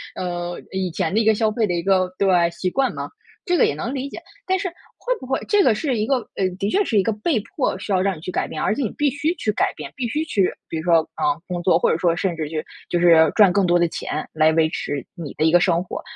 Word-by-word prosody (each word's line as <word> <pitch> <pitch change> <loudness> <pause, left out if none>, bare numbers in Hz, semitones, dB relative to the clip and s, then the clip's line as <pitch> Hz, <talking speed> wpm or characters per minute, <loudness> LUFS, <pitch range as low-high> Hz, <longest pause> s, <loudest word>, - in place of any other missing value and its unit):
呃， 175 -1 -4
以 190 -1 -2
前 160 +1 -2
的 215 - +3
一 225 - +1
个 220 -1 +5
消 220 0 +1
费 220 0 0
的 180 - -1
一 170 -1 -2
个 190 -1 +3
对， 200 - +1 0.2
习 170 +2 -2
惯 270 +7 0
嘛， - - -5 0.3
这 355 0 +1
个 - - +5
也 - - 0
能 230 - -4
理 270 0 -3
解。 - - -8 0.3
但 375 - +1
是 375 -1 -3 0.3
会 - - -1
不 - - -7
会 265 - -1
这 415 -1 +4
个 235 - +4
是 255 +1 -1
一 215 - 0
个， 270 - +2 0.2
呃 190 -1 +1
的 200 - 0
确 405 - +2
是 225 - 0
一 - - +2
个 225 - 0
被 225 +5 0
迫 255 - -2
需 200 - -3
要 185 - +3
让 195 -2 0
你 - - -11
去 165 - -7
改 - - -1
变， 155 - -6
而 - - +1
且 285 - -3
你 215 - -2
必 290 -1 +2
须 300 +5 -1
去 215 - -1
改 - - +1
变， - - -8
必 255 - -3
须 300 +4 -1
去 200 - +1 0.2
比 165 - -4
如 160 - -4
说， 170 -1 +4
呃， 150 -1 -1
工 175 -1 -4
作， 170 -2 +4
或 - - +2
者 - - +2
说 170 -1 +2
甚 175 0 -1
至 155 -2 -4
去 155 -1 -2 0.3
就 175 - +1
是 165 -3 +6
赚 200 -5 +5
更 200 -1 +3
多 175 0 +3
的 170 - +3
钱 155 -1 -4
来 155 0 +4
维 160 0 +3
持 145 -3 -4
你 165 -6 -7
的 155 - +1
一 160 - +4
个 175 0 +5
生 170 -2 +2
活， 180 - -6
190 Hz, 315 characters per minute, -22 LUFS, 170-230 Hz, 0.3 s, 是